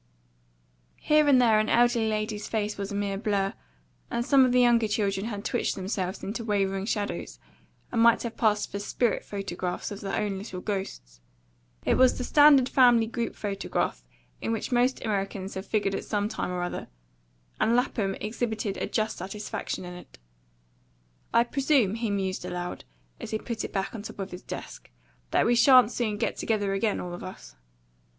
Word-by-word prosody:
Here 305 0 +3
and 270 -3 +6
there 225 -3 +5
an 215 - 0
elderly 240 -1 +3
lady's 215 0 -2
face 210 -1 -1
was 200 0 -5
a - - -3
mere 200 -1 -2
blur; 200 -3 0 0.6
and 235 - -1
some 275 -1 +6
of 255 - +1
the 250 - +4
younger 235 -2 +4
children 200 -1 -1
had 205 -3 -5
twitched - - 0
themselves 190 0 -3
into 225 +4 -4
wavering 195 -2 0
shadows, 205 -3 -3 0.5
and 230 - +1
might 235 0 +5
have 235 -1 -5
passed 210 -3 +1
for 200 - -3
spirit 220 +2 0
photographs 185 -3 -4
of 200 - -7
their 195 - -2
own 200 -2 -2
little 190 -2 -7
ghosts. 120 - -5 0.6
It - - +3
was 255 0 +5
the 250 - -3
standard 290 -1 +6
family 245 -4 +5
group 235 +1 -3
photograph, 200 -2 -2 0.4
in - - -2
which 225 +2 -3
most 245 +2 +1
Americans 195 -2 -2
have 190 +1 -6
figured 205 -2 0
at - - -3
some 205 -1 -1
time 215 - -3
or 180 -1 -2
other; 175 - -4 0.7
and 230 - +3
Lapham 215 -6 0
exhibited 220 -2 -3
a - - -2
just 215 -1 -1
satisfaction 195 0 -5
in 180 - -7
it. 180 - -13 1.1
"I 235 - +5
presume," 265 -4 +2
he 225 0 -2
mused 195 -2 -2
aloud, 180 0 -5 0.3
as - - -7
he 220 - -1
put 230 +1 -5
it - - -5
back 195 -1 -2
on 225 - -6
top 210 - -9
of 195 -1 -5
his 180 - -8
desk, - - -8 0.4
"that - - +2
we 240 - +4
sha'n't 250 -1 +6
soon 220 -5 -1
get 225 - -1
together 205 -3 0
again, 200 +1 0
all 175 -1 -5
of 175 - -7
us." 60 - -10
210 Hz, 185 wpm, -27 LUFS, 195-235 Hz, 1.1 s, and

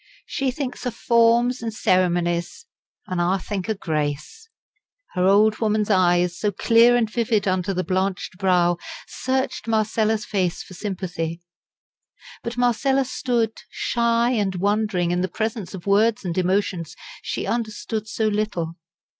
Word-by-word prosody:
She 270 -2 -1
thinks 255 0 -4
o' - - +2
forms 235 +1 +3
an' 230 - -2
ceremonies; 175 - 0 0.4
an' 185 -1 -2
I 175 +3 +2
think 195 +1 -4
o' 220 - +1
grace." 155 - -3 0.6
Her 180 0 +2
old 210 +2 +4
woman's 215 -1 +1
eyes, 175 -2 +3
so 210 - +1
clear 230 +4 +5
and 235 -2 +2
vivid 220 -2 0
under 185 0 0
the 185 -1 -1
blanched 185 -1 -2
brow, 175 -2 +3 0.3
searched 260 -2 -2
Marcella's 220 0 +1
face 185 -4 -1
for - - -13
sympathy. 175 -4 -4 1.0
But 235 +1 -5
Marcella 265 +3 +2
stood, 235 -3 -1
shy 235 0 +1
and 205 -6 0
wondering 200 -2 0
in 175 0 0
the 185 - 0
presence 215 0 -3
of 180 - -10
words 210 +1 +2
and 170 -2 -2
emotions 185 -2 0 0.3
she - - -3
understood 220 -1 -3
so 220 +1 -1
little. 205 -6 -2
205 Hz, 140 wpm, -23 LUFS, 180-230 Hz, 1.0 s, clear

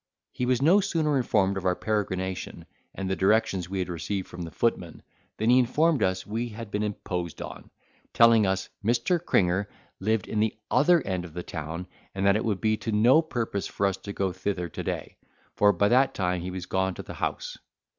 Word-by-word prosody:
He 125 - -2
was 130 +1 +2
no 175 +7 +6
sooner 160 -6 0
informed 100 -7 +2
of 95 - -5
our 90 - +2
peregrination, 95 -4 -3 0.3
and 95 - -4
the 95 - 0
directions 95 -3 +1
we 95 - -3
had 90 - -1
received 90 +3 -3
from 90 - -9
the 85 - -5
footman, 85 -1 -2 0.3
than 110 +2 +2
he 125 - +6
informed 150 +5 +2
us 95 0 0
we 115 +3 -3
had 110 -1 -8
been 105 - -1
imposed 90 -5 -4
upon, - - -8 0.4
telling 115 -3 +5
us, 95 0 -1
Mr. 120 - +1
Cringer 95 - +1 0.3
lived 110 +1 0
in 110 - -2
the 110 0 +1 0.2
other 170 +3 +4
end 90 -2 -2
of 85 -2 -11
the 90 - -4
town 80 +2 -5 0.3
and 95 0 -1
that 100 0 +5
it 110 - 0
would 105 -4 -1
be 110 -1 +2
to 110 +1 -4
no 120 +9 +5
purpose 115 -10 -3
for 100 - -1
us 95 -1 +1
to 100 - -8
go 95 -2 -1
thither 90 -3 -2
to - - -6
day, - - -4 0.4
for 105 0 +4
by 100 - +2
that 130 +5 +3
time 90 -2 0
he 90 - -4
was 90 -1 -5
gone 95 0 -1
to - - -7
the - - -8
House. - - -4
100 Hz, 210 wpm, -27 LUFS, 95-115 Hz, 0.4 s, no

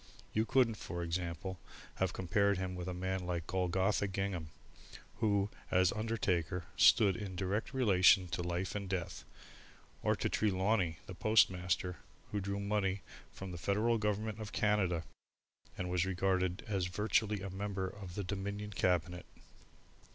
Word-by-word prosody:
You 110 +1 +1
couldn't, 120 -3 +3
for 85 -2 -5
example, 85 +2 -3 0.4
have 95 -2 +1
compared 100 +2 +1
him 95 0 -3
with 90 -1 -5
a - - -2
man 95 +1 -2
like 85 -2 -2
Golgotha 95 +3 +1
Gingham, 95 -4 -3 0.7
who, 100 -2 +1 0.2
as 90 0 +4
undertaker, 95 -6 -1
stood 100 -3 +6
in 105 -4 -5
a - - -8
direct 100 +3 -1
relation 95 -6 +5
to 90 - -2
life 90 +1 -2
and 100 -2 -4
death, 90 -3 -3 0.8
or - - +2
to - - -1
Trelawney, 95 -4 +1
the - - -7
postmaster, 90 -3 +2 0.3
who 105 - -1
drew 100 +1 -2
money 100 -2 0 0.3
from 95 -1 -7
the 85 - -6
Federal 110 +6 +1
Government 105 +1 -1
of 105 -1 -6
Canada, 95 -6 +1 0.7
and 90 - -2
was 90 -1 +1
regarded 95 +1 0
as 95 -4 0
virtually 105 +2 +1
a 100 - -4
member 100 0 -3
of 95 -2 -9
the 100 - -2
Dominion 100 +2 -4
Cabinet. 90 -1 0
95 Hz, 150 wpm, -34 LUFS, 90-105 Hz, 0.8 s, stood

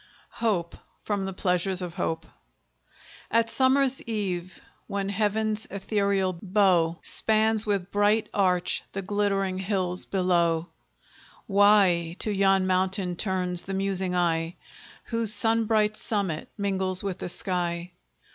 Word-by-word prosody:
HOPE 180 -7 0 0.3
From 200 -2 -2
the 195 - -3
'Pleasures 185 0 +1
of 180 -3 -3
Hope' 165 -2 -2 1.0
At 230 0 +2
summer 265 +1 +3 0.2
eve, 185 -5 -3 0.3
when 200 -1 -2
Heaven's 215 +1 0
ethereal 200 -2 -1
bow 180 -4 +2
Spans 220 0 +2
with 200 -3 -1
bright 205 +2 +2
arch 180 -3 +1
the 195 - -4
glittering 195 -1 0
hills 185 -2 -1
below, 175 -3 +1 0.8
Why 195 -5 +4
to 215 - 0
yon 195 -1 +3
mountain 185 0 0
turns 180 -2 -1
the 195 - -4
musing 190 -1 -1
eye, 165 -1 0 0.5
Whose 230 -2 0
sunbright 220 -1 +2
summit 195 -8 -2
mingles 190 -2 -1
with 190 -2 -3
the - - -4
sky? 175 -1 -3
195 Hz, 120 wpm, -26 LUFS, 180-210 Hz, 1.0 s, Why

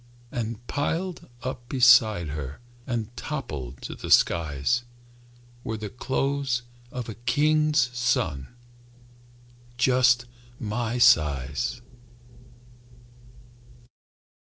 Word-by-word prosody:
And 115 -2 -4
piled 165 +6 -3
up 125 -1 -5
beside 120 - +5
her 70 -1 -6 0.3
And 120 -2 -3
toppling 75 - -5
to - - -6
the - - -8
skies, 80 - +3 0.8
Were 110 - -3
the 105 -1 -6
clothes 135 0 -1 0.3
of 125 -2 -5
a 115 - -5
king's 145 +2 +2
son, 80 - 0 1.3
Just 125 -1 +4 0.3
my 115 +2 -2
size. 75 - +3
120 Hz, 80 wpm, -26 LUFS, 105-130 Hz, 1.3 s, beside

